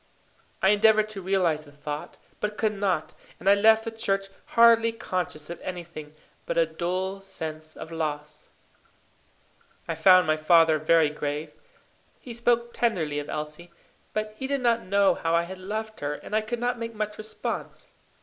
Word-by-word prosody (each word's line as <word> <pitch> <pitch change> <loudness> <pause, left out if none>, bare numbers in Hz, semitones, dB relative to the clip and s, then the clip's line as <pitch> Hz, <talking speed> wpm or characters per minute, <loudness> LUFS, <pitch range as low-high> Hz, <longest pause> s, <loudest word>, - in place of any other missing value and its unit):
I 190 - +6
endeavoured 215 +1 +4
to 205 -2 -6
realize 180 -5 +1
the 145 - -15
thought, 145 +1 -7 0.2
but 210 0 -3
could 215 -1 +1
not, 190 -6 -1 0.3
and - - -7
I 200 - +8
left 220 +2 +5
the 225 - -3
church 195 -3 -1 0.3
hardly 230 0 +7
conscious 180 -8 -4
of 170 - -8
anything 170 -4 -7 0.3
but - - -2
a 165 - +5
dull 185 +4 -3
sense 155 -5 -7
of 160 - -8
loss. 150 -2 -4 1.4
I 165 - -1
found 180 +3 +6
my 155 0 +2
father 160 0 +5
very 155 -1 +4
grave. 150 +1 -4 0.7
He 245 - -9
spoke 235 0 +1
tenderly 165 -11 0
of 145 - -7
Elsie; 150 +3 -6 0.4
but 215 0 -3
he 265 +4 -4
did 280 -1 -1
not 235 -1 +2
know 195 0 +3
how 165 -1 0
I 170 - +3
had 185 +2 -8
loved 215 +3 -5
her, 145 0 -2
and 210 - -6
I 215 - +3
could 220 +3 -4
not 245 0 -1
make 230 -1 -5
much 210 0 -4
response. 215 0 -5
185 Hz, 170 wpm, -26 LUFS, 155-215 Hz, 1.4 s, I